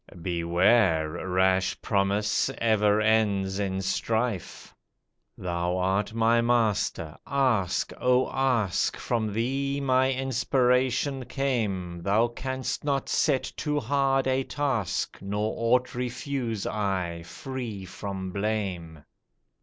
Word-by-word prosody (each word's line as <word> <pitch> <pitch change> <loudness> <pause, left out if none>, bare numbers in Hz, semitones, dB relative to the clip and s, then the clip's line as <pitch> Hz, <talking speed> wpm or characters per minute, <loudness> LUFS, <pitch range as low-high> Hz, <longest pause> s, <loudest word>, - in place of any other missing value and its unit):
"Beware! 85 0 +2 0.2
Rash 95 +1 +2
promise 100 0 +1
ever 105 -2 +3
ends 105 -3 +2
in 95 -1 -1
strife." 110 +1 -2 0.6
"Thou 90 0 -2
art 95 +3 0
my 115 +1 +3
Master, 110 -9 0
ask! 130 -10 +1
oh 125 0 +3
ask! 125 -9 +1
From 110 -3 -1
thee 135 +6 -1
my 130 -1 +2
inspiration 130 0 +1
came, 100 -12 -2
Thou 105 +6 +2
canst 130 +2 -4
not 140 -2 -1
set 145 -5 +2
too 150 -1 -1
hard 135 -2 +1
a 130 0 +1
task, 130 - -2
Nor 105 +2 -2
aught 125 +2 +1
refuse 125 -2 -3
I, 95 -5 -2
free 115 +1 -6
from 95 0 -6
blame." 95 -7 -3
110 Hz, 105 wpm, -27 LUFS, 95-130 Hz, 0.6 s, ever